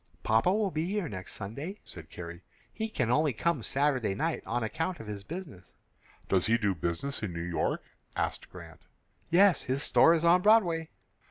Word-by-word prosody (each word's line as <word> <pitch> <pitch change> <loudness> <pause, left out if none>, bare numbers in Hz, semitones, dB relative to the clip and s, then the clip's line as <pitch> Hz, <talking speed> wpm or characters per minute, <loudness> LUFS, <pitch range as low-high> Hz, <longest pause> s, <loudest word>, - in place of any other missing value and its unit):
"Papa 110 +11 +3
will 205 -1 +1
be 155 0 -1
here 200 -2 -1
next 95 -7 -7
Sunday," 140 - -6
said 80 -3 -10
Carrie. 85 +1 -8 0.3
"He 220 0 -3
can 125 - 0
only 150 +1 +3
come 165 +3 0
Saturday 130 -5 +1
night 160 +9 -1
on 120 +1 -1
account 160 +11 -2
of 115 - -8
his 105 -2 -6
business." 150 - -9 0.5
"Does 95 -2 +2
he 115 +1 +4
do 105 -4 +1
business 85 - -3
in 105 -4 -3
New 85 - -5
York?" 85 -1 -1 0.3
asked - - -2
Grant. - - -12 0.5
"Yes; 190 +1 +5
his 135 +3 -2
store 165 - +5
is 165 0 0
on 175 +2 +6
Broadway." 180 -6 +4
140 Hz, 180 wpm, -30 LUFS, 100-170 Hz, 0.5 s, on